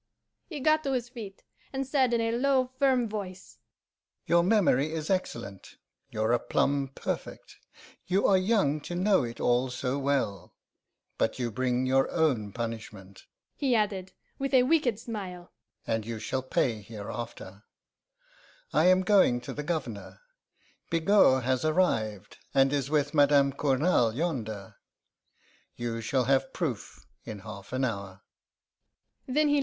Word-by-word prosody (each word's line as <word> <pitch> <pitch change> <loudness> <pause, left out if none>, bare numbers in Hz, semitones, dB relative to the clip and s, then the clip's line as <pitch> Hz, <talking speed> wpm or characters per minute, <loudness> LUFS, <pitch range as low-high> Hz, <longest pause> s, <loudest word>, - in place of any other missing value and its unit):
"He 310 -5 -6
got 310 +2 +3
to 275 - 0
his 245 -2 -2
feet, 215 -6 -9 0.3
and 270 0 -2
said 265 -2 +2
in 235 -1 +2
a 230 0 0
low, 255 +1 +1
firm 260 -4 +3
voice: 190 - -7 0.7
'Your 170 0 +4
memory 170 - +3
is 160 +2 -3
excellent, 100 - -4 0.3
your 110 +1 -1
aplomb 140 +3 +1
perfect. - - -5 0.5
You 190 +3 +2
are 195 - +5
young 185 -7 +2
to 175 - -6
know 190 +1 +3
it 115 -1 -6
all 125 +2 +2
so 125 +2 -2
well. 130 -10 -1 0.6
But - - 0
you 120 -2 -2
bring 125 +2 0
your 135 +1 +2
own 130 -11 +1
punishment,' 110 -4 -7 0.3
he 265 -4 +1
added, 200 -4 -1 0.3
with 275 0 0
a 250 - +6
wicked 260 -6 +2
smile, 190 -6 -7 0.3
'and 110 -1 -1
you 115 +1 -5
shall 125 +4 -2
pay 120 -3 0
hereafter. 105 -1 -8 1.1
I - - +4
am 185 0 +5
going 185 -11 +4
to - - -7
the 150 - -4
Governor. 145 - -5 0.7
Bigot 165 -6 +4
has 130 0 0
arrived, 115 - 0 0.2
and 135 +1 +4
is 140 -2 -1
with 145 -1 +1
Madame 140 -2 +4
Cournal 135 -3 +2
yonder. 115 - -4 1.0
You 115 -1 -4
shall 125 +3 0
have 135 +7 +1
proof 140 - -4 0.2
in 105 -2 -8
half 100 -2 -10
an 130 +1 0
hour. 100 -4 -5
140 Hz, 140 wpm, -28 LUFS, 120-195 Hz, 1.1 s, a